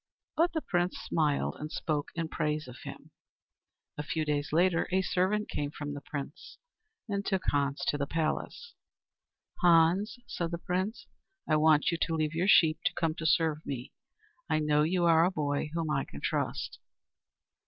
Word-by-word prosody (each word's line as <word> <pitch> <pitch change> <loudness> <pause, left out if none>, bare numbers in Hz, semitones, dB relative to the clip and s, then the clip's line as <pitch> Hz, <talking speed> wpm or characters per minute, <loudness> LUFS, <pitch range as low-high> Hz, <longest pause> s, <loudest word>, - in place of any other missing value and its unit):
But 335 +2 +2
the 315 - -2
Prince 175 0 0
smiled 150 -3 0
and 150 +1 -6
spoke 150 -4 -2
in 165 -1 -2
praise 155 -2 -2
of 125 0 -10
him. - - -10 0.9
A - - -1
few 155 +1 -2
days 145 -1 -1
later 170 +1 +3
a 190 +1 +2
servant 195 +3 +1
came 145 -1 -3
from 145 -1 -6
the 145 - -6
Prince 145 +1 -7 0.5
and 200 -2 -2
took 190 -2 -1
Hans 140 0 0
to 145 - 0
the 140 - -1
palace. 165 - -2 0.9
"Hans," 175 +5 +4
said 170 -1 -3
the 170 - -3
Prince, 185 +6 -2 0.4
"I 155 - +3
want 155 +3 +4
you 170 - -2
to 165 - +1
leave 155 -1 0
your 170 +3 0
sheep 160 -6 +5
to - - +2
come 165 -2 0
to 160 0 -3
serve 160 -1 +2
me. 130 -2 -5 0.6
I 155 - +2
know 150 -1 +2
you 175 +3 +2
are 165 -1 +6
a 175 - +4
boy 150 -4 -1
whom 165 -2 -1
I 135 -2 0
can 70 - -10
trust." - - -2
160 Hz, 175 wpm, -30 LUFS, 150-180 Hz, 0.9 s, are